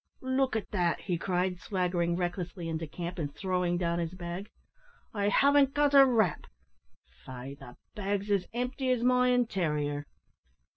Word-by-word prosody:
"Look 260 Hz, -2 st, +1 dB
at 220 Hz, -, -3 dB
that," 175 Hz, -4 st, 0 dB
he 175 Hz, -3 st, -2 dB
cried, 180 Hz, 0 st, -1 dB
swaggering 180 Hz, -3 st, 0 dB
recklessly 175 Hz, 0 st, -3 dB
into 165 Hz, 0 st, -3 dB
camp, 175 Hz, +3 st, -6 dB
and 145 Hz, -3 st, -2 dB
throwing 180 Hz, -2 st, 0 dB
down 170 Hz, -1 st, 0 dB
his 170 Hz, +1 st, -3 dB
bag; 175 Hz, +3 st, -6 dB, 0.6 s
"I 205 Hz, -1 st, +1 dB
haven't 280 Hz, +4 st, +4 dB
got 290 Hz, -1 st, +3 dB
a 275 Hz, -1 st, +8 dB
rap; 220 Hz, -10 st, +1 dB, 0.8 s
faix 130 Hz, +2 st, -8 dB
the 125 Hz, -3 st, -12 dB, 0.2 s
bag's 205 Hz, 0 st, -2 dB
as 195 Hz, -3 st, +1 dB
empty 250 Hz, +2 st, -2 dB
as 250 Hz, -2 st, +1 dB
my 250 Hz, 0 st, +4 dB
intarior." 155 Hz, -12 st, 0 dB
185 Hz, 150 wpm, -30 LUFS, 170-240 Hz, 0.8 s, a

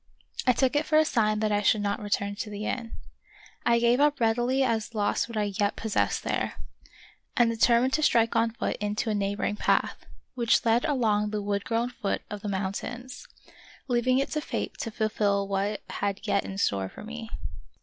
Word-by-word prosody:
I 250 Hz, -, +6 dB
took 260 Hz, +3 st, +1 dB
it 300 Hz, +1 st, +1 dB
for 310 Hz, -, +4 dB
a 310 Hz, -, +5 dB
sign 215 Hz, -6 st, +1 dB
that 215 Hz, -1 st, +1 dB
I 205 Hz, 0 st, +2 dB
should 210 Hz, +1 st, +3 dB
not 200 Hz, +1 st, -1 dB
return 200 Hz, -1 st, -1 dB
to 215 Hz, -, -4 dB
the 210 Hz, +1 st, -5 dB
inn. 230 Hz, -1 st, -3 dB, 0.7 s
I 235 Hz, -, +5 dB
gave 235 Hz, +2 st, +3 dB
up 295 Hz, 0 st, +3 dB
read 225 Hz, 0 st, +2 dB
ily 260 Hz, +3 st, +2 dB
as 230 Hz, -2 st, -1 dB
lost 205 Hz, +2 st, 0 dB
what 230 Hz, -, -5 dB
I 205 Hz, -1 st, 0 dB
yet 205 Hz, 0 st, +2 dB
possessed 220 Hz, -2 st, 0 dB
there, -, -, -1 dB, 0.8 s
and 235 Hz, -1 st, +4 dB
de -, -, -3 dB
termined 235 Hz, +3 st, +4 dB
to 310 Hz, -, +1 dB
strike 230 Hz, -6 st, +3 dB
on 230 Hz, 0 st, +3 dB
foot 230 Hz, -, -3 dB
into 210 Hz, +2 st, -1 dB
a -, -, 0 dB
neighboring 205 Hz, 0 st, -1 dB
path, -, -, +1 dB, 0.3 s
which 240 Hz, -1 st, +2 dB
led 230 Hz, +3 st, +3 dB
along 220 Hz, -8 st, +1 dB
the 210 Hz, -1 st, -3 dB
wood 200 Hz, 0 st, -1 dB
grown 235 Hz, +2 st, 0 dB
foot 200 Hz, -4 st, -3 dB
of 210 Hz, -1 st, -5 dB
the 205 Hz, -, -4 dB
mountains, 200 Hz, +6 st, -4 dB, 0.6 s
leaving 250 Hz, 0 st, +2 dB
it 275 Hz, -, 0 dB
to 305 Hz, -, -1 dB
fate -, -, -4 dB
to 230 Hz, -, -3 dB
fulfill 210 Hz, -2 st, 0 dB
what 195 Hz, 0 st, 0 dB
it 210 Hz, -, -6 dB
had 200 Hz, 0 st, -3 dB
yet 200 Hz, -2 st, +1 dB
in 195 Hz, -, -6 dB
store 100 Hz, -, 0 dB
for -, -, -11 dB
me. 225 Hz, +1 st, -7 dB
220 Hz, 205 wpm, -27 LUFS, 205-240 Hz, 0.8 s, I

